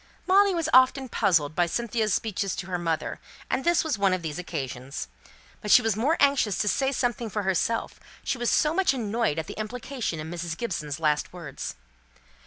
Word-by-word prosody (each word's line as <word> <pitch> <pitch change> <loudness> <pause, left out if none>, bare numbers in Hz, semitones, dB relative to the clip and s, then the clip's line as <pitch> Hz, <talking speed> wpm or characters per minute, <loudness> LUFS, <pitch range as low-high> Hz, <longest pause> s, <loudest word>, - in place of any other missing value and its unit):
Molly 390 0 +4
was 330 -2 0
often 260 0 +5
puzzled 155 -9 +2
by 175 +1 +2
Cynthia's 225 +2 -1
speeches 200 -1 -1
to 180 - -5
her 180 -1 -3
mother; 165 -2 -2 0.3
and 265 - 0
this 345 -1 +3
was 300 -10 -2
one 195 -2 +3
of 185 -2 -2
these 160 +1 -4
occasions. 135 - -5 0.5
But 210 - -5
she 245 - +7
was 225 -3 +1
more 275 +10 +1
anxious 275 -8 +3
to 210 - 0
say 270 +5 +1
something 240 -3 -1
for 210 0 -2
herself; 195 +4 -1 0.2
she 255 - -2
was 240 - +1
so 300 0 +3
much 365 -6 +2
annoyed 225 - -1
at 160 - -2
the - - -8
implication 235 - -4
in 155 +2 -6
Mrs. 170 -1 -4
Gibson's 155 -10 -3
last 150 -2 +1
words. 170 -7 -7
210 Hz, 195 wpm, -26 LUFS, 170-255 Hz, 0.5 s, she